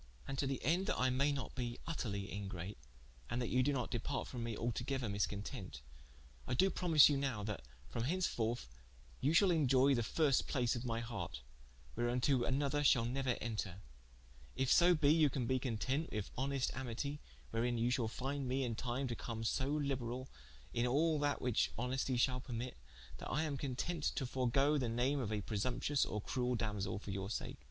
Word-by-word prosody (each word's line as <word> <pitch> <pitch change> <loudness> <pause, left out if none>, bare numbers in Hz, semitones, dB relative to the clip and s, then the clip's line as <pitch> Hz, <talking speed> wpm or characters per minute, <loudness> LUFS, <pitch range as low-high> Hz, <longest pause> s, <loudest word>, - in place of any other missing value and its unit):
And 135 - -3
to 140 - +1
the 135 -2 -1
ende 175 +6 +2
that - - 0
I 130 0 +3
may 140 +3 +2
not 140 -2 -4
be 120 -2 -3
vtterly 105 -11 -2
ingrate, 95 -3 -5 0.5
and 120 - -1
that 120 - -1
you 125 - +3
doe 140 +3 +2
not 125 -3 -2
departe 135 +3 -2
from 120 -2 -4
me, 115 -2 -3
altogether 120 +2 -2
miscontent, 100 - -3 0.7
I - - 0
doe 190 +9 +4
promise 165 -5 +6
you 145 - +2
nowe 135 -7 -1
that 105 -6 -3 0.3
from 115 +6 -3
henceforth, 120 - 0 0.5
you 145 +4 +2
shall 195 +2 +6
inioye 140 -4 +4
the 120 - +1
first 140 +4 +2
place 125 -3 +1
of 120 - -4
my 115 -1 -1
harte, 105 - -5 0.5
whereunto 120 +2 +2
another 140 +3 +1
shall 120 -4 +5
neuer 130 0 0
enter: 105 -5 -3 0.8
if 135 0 +1
so 175 0 +6
be 150 -1 +4
you 155 -2 +5
can 130 -2 -2
be 130 +2 +1
content 130 +5 -1
with 105 -2 -3
honest 135 0 0
amitie, 130 +3 -3 0.3
wherein 120 +1 0
you 120 +2 +2
shall 125 -3 +1
finde 135 +4 -3
me 130 +2 0
in 120 -2 -1
time 125 +4 -2
to 120 - -3
come 115 -1 -5
so 130 +4 0
liberall, 135 -3 -2 0.4
in 120 +1 +1
all 155 +4 +2
that 145 0 0
whiche 125 -3 +2
honestie 125 +1 0
shall 125 +1 +2
permitte, 125 0 -4 0.5
that - - -6
I 150 +6 +1
am 150 -3 -1
contente 145 +4 -1
to 135 - -1
forgoe 135 +4 +2
the 125 -3 0
name 125 +5 +1
of 115 -5 -2
a 105 -1 -1
presumptuous 125 +7 0
or 105 0 -3
cruell 125 -1 0
Damosell 105 -3 -2
for 100 - -7
your 95 0 -3
sake. - - -4
125 Hz, 190 wpm, -37 LUFS, 115-140 Hz, 0.8 s, promise